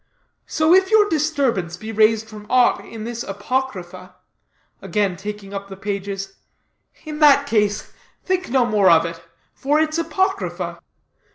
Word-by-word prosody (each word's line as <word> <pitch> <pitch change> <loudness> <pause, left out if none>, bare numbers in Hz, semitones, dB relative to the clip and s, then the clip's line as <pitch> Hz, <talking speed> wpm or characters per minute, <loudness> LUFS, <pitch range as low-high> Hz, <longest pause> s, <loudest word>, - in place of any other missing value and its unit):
So 315 +2 +2
if 380 0 +4
your 435 -1 +5
disturbance 275 - 0
be 220 +4 -7
raised 220 0 +3
from 210 -1 -11
aught 250 -1 +3
in 225 -2 -9
this 235 +1 -5
apocrypha," 195 -5 -4 0.7
again 205 -4 -1
taking 200 +1 -7
up 200 0 -5
the 195 -1 -10
pages, 195 -1 -5 0.7
"in 305 -1 -6
that 285 -2 +6
case, 210 -5 0 0.3
think 370 -1 -1
no 255 -1 +3
more 210 -5 +3
of 165 -1 +5
it, 165 0 -6 0.3
for 290 +3 0
it's 315 +1 0
apocrypha." 380 +4 -2
220 Hz, 145 wpm, -21 LUFS, 195-300 Hz, 0.7 s, that